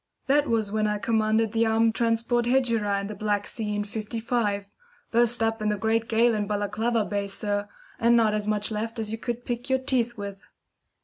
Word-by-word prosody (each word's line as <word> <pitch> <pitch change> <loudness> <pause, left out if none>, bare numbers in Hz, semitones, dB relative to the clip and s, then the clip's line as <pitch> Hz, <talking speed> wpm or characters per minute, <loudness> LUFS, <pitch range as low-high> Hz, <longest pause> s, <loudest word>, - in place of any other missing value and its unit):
That 290 +2 +3
was 220 -3 0
when 215 0 +1
I 210 0 0
commanded 220 0 +1
the 225 0 +2
armed 225 0 +3
transport 230 +1 +1
Hegira 230 -6 +2
in - - -5
the 210 - -5
Black 205 0 -1
Sea 210 -2 -3
in 205 - -1
'55. 215 -1 -2 0.4
Burst 235 0 +2
up 225 0 0
in 215 - +1
the 210 - 0
great 225 +2 0
gale 230 +1 +4
in 210 -2 -1
Balaclava 215 +2 0
Bay, 200 -1 -2
sir, 205 +1 -1 0.3
and 235 0 +4
not 220 -2 +3
as 210 -1 -2
much 210 0 0
left 225 +2 -3
as 220 -1 -3
you 225 - -4
could 240 +1 -4
pick 240 +1 -4
your 265 - +3
teeth 245 -3 -1
with." 200 -1 -6
220 Hz, 200 wpm, -26 LUFS, 210-235 Hz, 0.4 s, gale